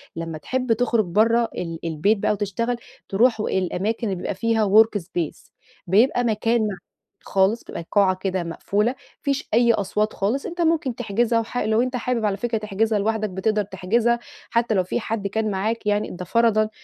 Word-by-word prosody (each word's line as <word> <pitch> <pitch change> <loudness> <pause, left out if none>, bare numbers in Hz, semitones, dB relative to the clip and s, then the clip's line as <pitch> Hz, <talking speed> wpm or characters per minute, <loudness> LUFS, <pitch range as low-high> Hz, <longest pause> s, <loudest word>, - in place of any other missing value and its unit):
لمّا 165 -1 -5
تحب 250 - -1
تخرِّج 230 -1 +1
برَّه 230 +6 +3
ال 165 -2 -4
البيت 165 +7 +1
بقى - - +1
وتشتغل، 210 +4 -1 0.3
تروح 225 +3 +3
الأماكن 200 +4 -1
اللي 195 - -1
بيبقى 180 - -4
فيها 225 +1 +1 0.2
workspace، 175 -7 -5 0.4
بيبقى 230 +7 +3
مكان 230 +1 +1
مع 205 - -3 0.5
خالص، 195 +4 +1
بيبقى 170 - -7
قاعة 195 -2 +4
كده 185 -2 -1
مقفولة، 200 +6 0
ما 265 - -12 0.2
فيش 280 0 -2
أي 235 +1 +5
أصوات 210 +1 -1
خالص. 225 +8 -1
أنت 350 0 -4
ممكن 320 -7 +1
تحجزها، 230 0 +1
وح 230 +2 -5
لو 220 -1 +2
أنت 255 +1 -1
حابب، 245 -2 -1
على 200 -2 0
فكرة، 230 +2 -1
تحجزها 215 +1 0
لوحدك، 215 +1 0
بتقدر 210 +3 0
تحجزها، 220 +5 0 0.3
حتى 235 -1 +1
لو 185 - +3
في 185 - -2
حد 220 -3 -3
كان 215 +1 -1
معاك، 215 +4 -2
يعني 210 0 +1
ده 180 0 -7
فرضًا، 220 0 +3
215 Hz, 175 wpm, -23 LUFS, 195-235 Hz, 0.5 s, أي